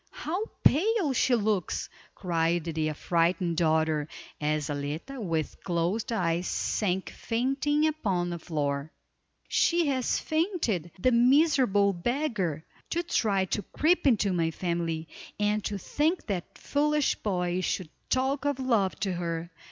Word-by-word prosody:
How 365 Hz, +7 st, -1 dB, 0.2 s
pale 370 Hz, -, +3 dB
she 250 Hz, 0 st, +3 dB
looks!" 210 Hz, -5 st, 0 dB, 0.3 s
cried 170 Hz, -2 st, 0 dB
the 160 Hz, -1 st, -1 dB
affrighted 170 Hz, +2 st, +1 dB
daughter, 160 Hz, -2 st, +2 dB, 0.3 s
as 150 Hz, 0 st, 0 dB
Zaletta 150 Hz, -, -4 dB
with 165 Hz, -6 st, -2 dB
closed 180 Hz, +6 st, -1 dB
eyes 175 Hz, -4 st, 0 dB
sank 190 Hz, -3 st, -1 dB
fainting 275 Hz, +6 st, 0 dB
upon 195 Hz, -, 0 dB
the 170 Hz, -, -4 dB
floor. 145 Hz, -3 st, -2 dB, 0.6 s
"She 340 Hz, -1 st, +3 dB
has 260 Hz, -3 st, +1 dB
fainted, 315 Hz, -, -1 dB
the 255 Hz, +8 st, +2 dB
miserable 250 Hz, -5 st, +4 dB
beggar. 190 Hz, -, -1 dB, 0.2 s
To 340 Hz, +1 st, 0 dB
try 200 Hz, -, +1 dB
to 210 Hz, -, 0 dB
creep 315 Hz, -, +1 dB
into 210 Hz, -6 st, +3 dB
my 165 Hz, -2 st, +1 dB
family, 165 Hz, -1 st, -2 dB, 0.3 s
and 210 Hz, 0 st, +1 dB
to 205 Hz, -, -2 dB
think 305 Hz, -, 0 dB
that 190 Hz, -5 st, -4 dB
foolish 300 Hz, 0 st, +1 dB
boy 180 Hz, -3 st, -1 dB
should 185 Hz, -2 st, -2 dB, 0.2 s
talk 265 Hz, +1 st, +1 dB
of 285 Hz, -2 st, 0 dB
love 225 Hz, -8 st, +1 dB
to 195 Hz, -2 st, 0 dB
her. 170 Hz, -1 st, -3 dB
195 Hz, 130 wpm, -28 LUFS, 170-265 Hz, 0.6 s, miserable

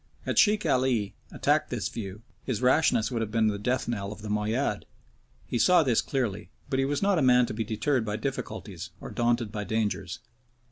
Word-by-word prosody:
Had -, -, +1 dB
Sheikh 210 Hz, -1 st, +4 dB
Ali 125 Hz, -6 st, +1 dB, 0.2 s
attacked -, -, +1 dB
this -, -, -2 dB
view, 105 Hz, -1 st, -7 dB, 0.2 s
his 130 Hz, -5 st, -2 dB
rashness 130 Hz, -3 st, +3 dB
would 115 Hz, -2 st, -1 dB
have 110 Hz, -, -2 dB
been 110 Hz, 0 st, +2 dB
the 100 Hz, -1 st, -3 dB
death 125 Hz, +5 st, -1 dB
knell 100 Hz, -4 st, -3 dB
of 105 Hz, 0 st, -10 dB
the 105 Hz, -, -5 dB
Moayyad. 105 Hz, +1 st, -1 dB, 0.6 s
He 120 Hz, -, -2 dB
saw 180 Hz, +2 st, +5 dB
this 125 Hz, -5 st, +2 dB
clearly, 110 Hz, -7 st, -2 dB, 0.2 s
but 130 Hz, -, +1 dB
he 135 Hz, -, +2 dB
was 145 Hz, +5 st, -1 dB
not 200 Hz, -3 st, +3 dB
a -, -, +1 dB
man 125 Hz, -2 st, +5 dB
to -, -, -5 dB
be 110 Hz, +1 st, -2 dB
deterred 115 Hz, +4 st, 0 dB
by 105 Hz, -1 st, -3 dB
difficulties, 110 Hz, -, -5 dB
or -, -, -8 dB
daunted 120 Hz, -2 st, 0 dB
by 105 Hz, -1 st, -3 dB
dangers. 110 Hz, 0 st, -2 dB
115 Hz, 200 wpm, -28 LUFS, 105-130 Hz, 0.6 s, saw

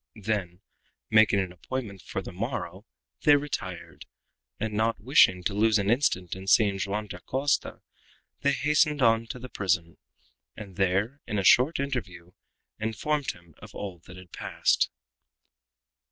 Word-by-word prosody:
Then, 95 Hz, -4 st, -3 dB, 0.5 s
making 110 Hz, -2 st, +5 dB
an 95 Hz, -2 st, -4 dB
appointment 100 Hz, 0 st, -6 dB
for 95 Hz, -, -5 dB
the -, -, -8 dB
morrow, 100 Hz, -1 st, -5 dB, 0.3 s
they 145 Hz, -, +6 dB
retired, 115 Hz, -12 st, -5 dB, 0.5 s
and 110 Hz, -1 st, -3 dB
not 110 Hz, +2 st, 0 dB
wishing 105 Hz, -6 st, +4 dB
to 100 Hz, -, -1 dB
lose 110 Hz, +1 st, +3 dB
an 100 Hz, +1 st, +1 dB
instant 95 Hz, -, +1 dB
in 95 Hz, +1 st, -9 dB
seeing 100 Hz, -1 st, +4 dB
Joam 105 Hz, +2 st, -2 dB
Dacosta, 130 Hz, +10 st, -2 dB, 0.6 s
they 140 Hz, 0 st, +2 dB
hastened 150 Hz, -1 st, +2 dB
on 115 Hz, 0 st, +3 dB
to 125 Hz, -, -6 dB
the 125 Hz, +1 st, -8 dB
prison, 85 Hz, -7 st, -1 dB, 0.6 s
and 100 Hz, -3 st, -9 dB
there, 100 Hz, +9 st, 0 dB
in 105 Hz, -, -2 dB
a 100 Hz, -, 0 dB
short 130 Hz, -, +5 dB
interview, 100 Hz, -11 st, -4 dB, 0.5 s
informed 130 Hz, +7 st, -1 dB
him 85 Hz, -2 st, -19 dB
of -, -, -13 dB
all 95 Hz, -4 st, -6 dB
that 90 Hz, -, -11 dB
had 90 Hz, -2 st, -14 dB
passed. -, -, +1 dB
105 Hz, 145 wpm, -27 LUFS, 95-125 Hz, 0.6 s, they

